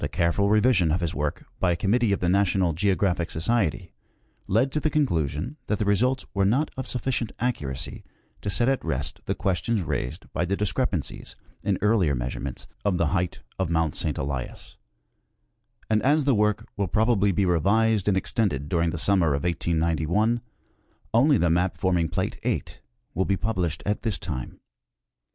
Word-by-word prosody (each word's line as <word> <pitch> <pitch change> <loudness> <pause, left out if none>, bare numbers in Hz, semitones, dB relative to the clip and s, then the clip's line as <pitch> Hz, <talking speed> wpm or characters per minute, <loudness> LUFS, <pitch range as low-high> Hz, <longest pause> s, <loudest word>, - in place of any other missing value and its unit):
careful 85 +7 +1
revision 105 -6 +4
of 85 - +1
his 85 -2 -2
work 75 0 -3
by 95 - +2
a - - 0
committee 105 +5 +2
of 100 - +1
the 90 - +1
National 95 -2 +2
Geographic 90 0 +1
Society 90 - 0 0.5
led 115 +7 +2
to 150 - 0
the 155 - 0
conclusion 100 - 0
that 105 - 0
the 105 - -1
results 125 +6 +2
were 100 -1 +1
not 125 +11 +2
of 130 - -5
sufficient 125 -2 -1
accuracy 70 - -3 0.4
to - - -3
set 120 +4 +2
at 135 -1 +1
rest 70 -3 -3
the - - -1
questions 95 +3 0
raised 65 -6 -3
by 85 - 0
the 95 +3 -1
discrepancies 100 -6 -2 0.3
in 100 -2 0
earlier 100 -9 +3
measurements 65 +2 -4 0.2
of 100 -3 +1
the 85 -3 +2
height 90 -2 -1 0.2
of 95 -3 0
Mount 80 -3 +1
St. - - -2
Elias; 70 -2 -5 1.1
and 110 -1 +2
as 150 +3 +3
the 140 -1 +3
work 105 -1 +1
will 100 -2 -1
probably 105 0 +2
be 95 +1 +1
revised 100 +4 +2
and 100 -2 +3
extended 85 - -1
during 85 0 +1
the 85 - -3
summer 85 -4 +3
of 70 - -3
1891, 85 +6 +1 0.7
only 135 +5 +5
the 85 -4 +2
map 90 +2 +1
forming 90 -4 +1
plate - - -2
8 - - -3 0.3
will 95 - 0
be 100 - +1
published 90 -5 -2
at 105 0 -1
this 110 -5 -1
time. 65 -8 -6
95 Hz, 170 wpm, -25 LUFS, 85-110 Hz, 1.1 s, only